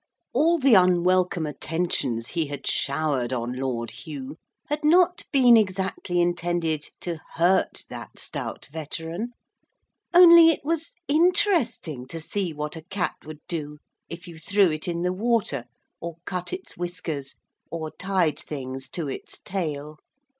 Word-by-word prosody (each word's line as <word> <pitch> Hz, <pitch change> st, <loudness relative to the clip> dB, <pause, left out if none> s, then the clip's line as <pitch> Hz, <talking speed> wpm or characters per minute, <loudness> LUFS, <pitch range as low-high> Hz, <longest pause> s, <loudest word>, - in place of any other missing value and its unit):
All 325 Hz, +6 st, +4 dB
the 275 Hz, -5 st, +4 dB
unwelcome 180 Hz, -2 st, +4 dB
attentions 150 Hz, -7 st, -1 dB
he 165 Hz, -3 st, -1 dB
had 140 Hz, -2 st, -7 dB
showered 140 Hz, -4 st, 0 dB
on 120 Hz, -1 st, -2 dB
Lord 125 Hz, -3 st, -3 dB
Hugh 145 Hz, -1 st, -8 dB, 0.3 s
had 295 Hz, +1 st, -2 dB
not 355 Hz, +3 st, +4 dB
been 250 Hz, -4 st, +7 dB
exactly 190 Hz, -4 st, 0 dB
intended 175 Hz, -3 st, 0 dB
to 170 Hz, -2 st, -3 dB, 0.2 s
hurt 175 Hz, +3 st, +2 dB
that -, -, -9 dB
stout -, -, -4 dB
veteran 165 Hz, +8 st, -5 dB, 0.8 s
only 340 Hz, -2 st, +9 dB
it 310 Hz, -3 st, 0 dB
was 330 Hz, +1 st, -1 dB
interesting 305 Hz, -, +2 dB
to 165 Hz, -, -6 dB
see 185 Hz, +2 st, -3 dB
what 150 Hz, +1 st, -4 dB
a 160 Hz, -, -7 dB
cat 180 Hz, +2 st, -2 dB
would 155 Hz, 0 st, -9 dB
do 150 Hz, -3 st, -4 dB, 0.3 s
if 170 Hz, +2 st, -8 dB
you 165 Hz, -2 st, -10 dB
threw 195 Hz, +2 st, +3 dB
it 155 Hz, +2 st, -3 dB
in 170 Hz, 0 st, -2 dB
the 180 Hz, 0 st, +1 dB
water, 205 Hz, -, 0 dB, 0.3 s
or 170 Hz, -1 st, -6 dB
cut 180 Hz, -2 st, -3 dB
its 370 Hz, +1 st, -6 dB
whiskers, 175 Hz, -6 st, -4 dB, 0.3 s
or 160 Hz, -2 st, -4 dB
tied 180 Hz, -6 st, 0 dB
things 135 Hz, -2 st, -6 dB
to 165 Hz, -4 st, -3 dB
its 135 Hz, -, -6 dB
tail. 155 Hz, -5 st, -4 dB
175 Hz, 140 wpm, -25 LUFS, 150-205 Hz, 0.8 s, only